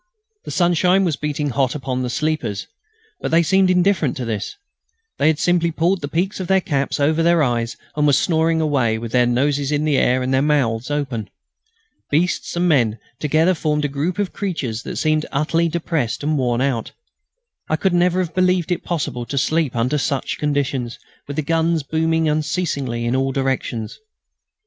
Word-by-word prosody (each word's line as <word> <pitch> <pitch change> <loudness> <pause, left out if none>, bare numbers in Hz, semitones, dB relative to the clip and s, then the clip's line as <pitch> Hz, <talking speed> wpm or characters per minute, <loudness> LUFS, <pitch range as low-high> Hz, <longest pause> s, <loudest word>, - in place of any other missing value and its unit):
The - - -6
sunshine 180 +2 +3
was 165 -4 0
beating 150 -1 -2
hot 130 0 0
upon 130 -3 -3
the 125 - -2
sleepers, 140 -8 -2 0.5
but - - -3
they 165 +1 +4
seemed 190 +2 +3
indifferent 180 -6 +2
to 125 - -3
this. 110 -3 -4 0.6
They - - +3
had 160 -1 +3
simply 175 0 +2
pulled 170 +3 0
the 145 - -3
peaks 180 +8 -1
of 185 - -4
their 190 +1 +4
caps 145 -7 -1
over 155 +3 +2
their 170 -1 +4
eyes 120 -3 -1 0.2
and 150 -1 +2
were 145 - +4
snoring 160 +2 +2
away, 130 -8 +1
with 115 0 -6
their 125 -1 +3
noses 140 +3 +1
in 150 +1 0
the 145 -3 +2
air 125 +1 +2
and 130 +1 -1
their 130 - +3
mouths 130 -5 +1
open. 135 -8 -3 0.8
Beasts 170 +5 0
and 175 +1 +1
men 120 -9 +2 0.2
together 155 +4 +2
formed 150 -3 0
a - - +2
group 145 +6 -2
of 205 -2 -2
creatures 140 - -3
that - - -6
seemed 155 -1 +1
utterly 165 +4 +1
depressed 160 -7 -2
and 155 +1 +1
worn 125 -3 0
out. 130 -4 -1 0.8
I 155 - +2
could 185 +3 0
never 175 +1 +3
have 175 -2 -4
believed 185 -1 +1
it 175 - -1
possible 135 -8 -3
to 140 - -4
sleep 155 -1 +1
under 125 +6 +1
such 140 -1 -2
conditions, 140 -5 -1 0.3
with 145 - -5
the 155 - -1
guns 165 +1 +1
booming 160 +2 +1
unceasingly 150 -6 -1
in 120 +2 0
all 135 0 +1
directions. 130 -4 -2
150 Hz, 185 wpm, -20 LUFS, 130-165 Hz, 0.8 s, they